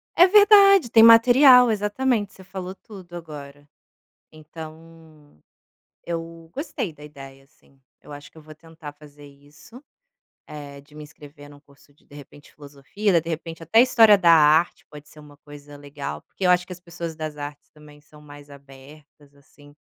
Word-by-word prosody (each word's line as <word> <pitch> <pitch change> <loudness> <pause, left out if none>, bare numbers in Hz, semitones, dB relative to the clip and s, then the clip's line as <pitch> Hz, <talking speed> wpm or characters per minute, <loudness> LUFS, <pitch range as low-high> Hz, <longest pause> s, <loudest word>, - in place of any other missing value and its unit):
É 355 - +5
verdade, 395 - +4
tem 225 - +5
material, 245 +2 +6
exatamente, 210 +1 -3
você 190 - -17
falou 190 0 -9
tudo 185 -4 -15
agora. 145 -3 -12 0.6
Então 155 - -16 0.7
eu 165 -1 -8
gostei 265 - -6
da 150 - -19
ideia, 135 -2 -14
assim, 135 -1 -32 0.2
eu - - -15
acho 145 0 -13
que - - -19
eu - - -16
vou 155 0 -15
tentar 160 -1 -14
fazer 145 -1 -18
isso, 145 - -19 0.6
eh, 145 -2 -12
de 145 +2 -25
me 150 - -12
inscrever 145 -1 -16
em - - -16
um 145 - -20
curso 145 0 -26
de 145 - -34
de - - -19
repente, 145 0 -17
filosofia, 150 +7 -3
de 165 - -12
repente 165 0 -8
até 195 +9 +3
história 225 -5 +4
da 175 -3 +2
arte 155 +1 +2
pode 150 0 -15
ser - - -19
uma 145 -1 -18
coisa 145 0 -15
legal, 145 0 -9
porque 195 - -10
eu - - +3
acho 180 0 +1
que - - -11
as 180 - -12
pessoas 170 -1 -9
das 155 -1 -8
artes 145 0 -10
também 150 -1 -19
são 150 +1 -21
mais 145 -1 -16
abertas, 140 +1 -19
assim 145 +1 -22
155 Hz, 175 wpm, -21 LUFS, 145-180 Hz, 0.7 s, material